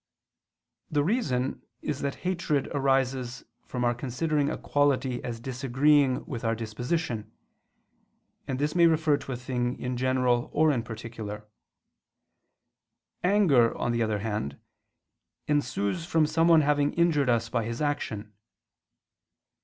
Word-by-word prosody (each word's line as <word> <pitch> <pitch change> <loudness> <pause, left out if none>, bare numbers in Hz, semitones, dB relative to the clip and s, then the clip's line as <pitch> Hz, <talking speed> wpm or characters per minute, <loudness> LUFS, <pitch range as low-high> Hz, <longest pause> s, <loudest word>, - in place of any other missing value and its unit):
The 145 -2 +1
reason 145 - 0 0.2
is 145 - -2
that 140 -1 -2
hatred 170 -6 0
arises 135 -3 0 0.2
from 125 -1 -3
our 120 - +3
considering 145 +4 -1
a - - -3
quality 135 -3 +1
as 115 -2 -4
disagreeing 130 +2 +2
with 120 -3 -6
our 115 0 +1
disposition; 115 - -3 1.2
and 130 - -2
this 150 +2 0
may 170 -1 +6
refer 155 -2 +3
to 135 - -8
a - - -2
thing 125 0 -2
in 125 0 -3
general 125 -1 +1
or 155 0 +4
in 125 -5 0
particular. 110 -2 -7 1.8
Anger, 180 - +4
on 120 - -1
the 120 0 0
other 110 -2 +1
hand, 105 -11 -3 0.9
ensues 130 -3 0
from 165 -2 +2
someone 165 +1 +4
having 145 0 +2
injured 160 -6 +3
us 115 -1 +2
by 115 0 -1
his 115 +1 -4
action. 115 -8 -2
130 Hz, 130 wpm, -27 LUFS, 120-150 Hz, 1.8 s, may